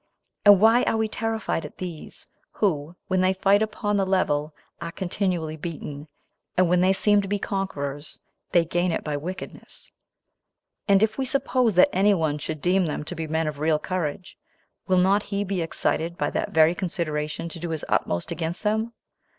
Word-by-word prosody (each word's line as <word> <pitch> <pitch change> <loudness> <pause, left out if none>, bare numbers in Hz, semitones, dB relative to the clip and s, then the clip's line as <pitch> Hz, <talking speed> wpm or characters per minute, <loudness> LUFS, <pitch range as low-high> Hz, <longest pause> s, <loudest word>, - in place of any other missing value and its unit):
and 205 -2 +9
why 225 +4 +6
are - - +1
we 220 0 +1
terrified 220 -5 -2
at 150 - -10
these, 175 -4 -7 0.3
who, 165 -5 -1
when 185 0 +1
they 185 +1 +3
fight 195 +2 +3
upon 210 -1 -1
the 195 - +2
level, 155 -6 +1 0.3
are 170 0 -4
continually 180 -4 -2
beaten, 150 -2 -7 0.5
and 185 -1 +5
when 180 +1 +3
they 185 +1 +4
seem 205 +1 +4
to 195 - -6
be 205 +1 0
conquerors, 150 -8 -4 0.3
they 170 -1 +4
gain 175 +2 0
it - - -2
by 150 -1 -2
wickedness? 175 +6 -8 1.0
and 200 0 +5
if 220 +4 0
we - - +1
suppose 255 -4 +1
that 180 - +7
any 200 +2 +4
one 155 -4 0
should 155 0 -5
deem 185 0 +3
them 150 - -3
to 160 - -6
be 165 -2 -4
men 160 +1 0
of 150 -2 -4
real 155 0 +2
courage, 180 +1 -4 0.5
will 185 -1 +3
not 190 +3 +4
he 200 0 -2
be 195 -2 -2
excited 165 +1 -1
by 145 - -1
that - - -2
very 160 +1 +5
consideration 165 -4 -3
to 165 0 -7
do 170 +1 -4
his 160 -2 -3
utmost 85 0 -1
against 165 +3 -3
them? 220 +2 0
180 Hz, 185 wpm, -25 LUFS, 155-200 Hz, 1.0 s, and